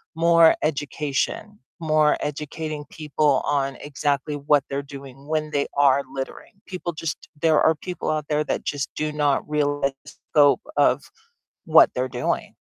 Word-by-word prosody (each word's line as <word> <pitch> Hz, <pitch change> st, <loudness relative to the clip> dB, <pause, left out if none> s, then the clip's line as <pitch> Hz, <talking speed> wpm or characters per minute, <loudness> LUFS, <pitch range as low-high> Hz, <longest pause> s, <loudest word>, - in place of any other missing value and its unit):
more 165 Hz, 0 st, +5 dB
education, 150 Hz, -, -2 dB, 0.2 s
more 155 Hz, -2 st, +3 dB
educating 150 Hz, +1 st, -5 dB
people 150 Hz, -2 st, +1 dB
on 135 Hz, -2 st, 0 dB
exactly 145 Hz, 0 st, -2 dB
what 145 Hz, -1 st, +2 dB
they're 140 Hz, +1 st, -3 dB
doing 140 Hz, 0 st, -12 dB
when 155 Hz, -1 st, -1 dB
they 140 Hz, -1 st, 0 dB
are 140 Hz, -1 st, +4 dB
littering, 135 Hz, -1 st, -6 dB, 0.2 s
people 180 Hz, -2 st, -4 dB
just 165 Hz, 0 st, -5 dB
there 160 Hz, -2 st, +4 dB
are 160 Hz, -, +4 dB
people 180 Hz, +3 st, -5 dB
out 155 Hz, -1 st, -2 dB
there 150 Hz, 0 st, +1 dB
that -, -, -3 dB
just 145 Hz, -2 st, -3 dB
do 155 Hz, 0 st, -2 dB
not 145 Hz, -2 st, 0 dB
realize 145 Hz, -2 st, 0 dB
the 145 Hz, -, -11 dB, 0.2 s
scope 145 Hz, +6 st, +5 dB, 0.2 s
of -, -, +3 dB, 0.7 s
what -, -, +7 dB
they're -, -, -1 dB
doing. -, -, -2 dB
150 Hz, 150 wpm, -23 LUFS, 140-155 Hz, 0.7 s, what